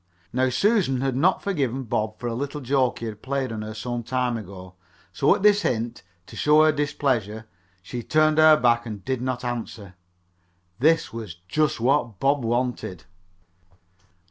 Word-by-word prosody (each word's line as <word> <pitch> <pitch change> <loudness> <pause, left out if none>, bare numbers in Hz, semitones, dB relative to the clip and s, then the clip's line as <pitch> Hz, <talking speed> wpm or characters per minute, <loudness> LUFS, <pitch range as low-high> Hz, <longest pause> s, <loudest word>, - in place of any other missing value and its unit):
Now 130 +1 +2
Susan 170 - +1
had 135 -2 -1
not 175 +8 +2
forgiven 135 - -1
Bob 110 -2 -2
for 120 - -8
a 120 - -1
little 140 +4 -4
joke 130 -1 +1
he 115 - -6
had 110 -1 -7
played 135 -2 -2
on 110 -1 -4
her 110 0 -7
some 120 +2 -4
time 125 +1 -1
before, 95 -4 -8 0.4
so - - +3
at - - -6
his 205 -1 +5
hint, 115 - -2 0.2
to - - -13
show 150 +1 +4
her 155 - +5
displeasure, 130 -7 -1 0.4
she 120 +6 -6
turned 155 +4 +2
her 155 -1 +7
back 120 -1 +2
and 105 -3 -7
did 130 -2 -2
not 125 -1 -3
answer. 115 -5 -5 0.9
This 160 +1 +2
was 110 -7 -7
just 150 +6 0
what 120 -4 +1
Bob 140 -1 +1
wanted. 120 -6 -2
125 Hz, 170 wpm, -24 LUFS, 115-145 Hz, 0.9 s, her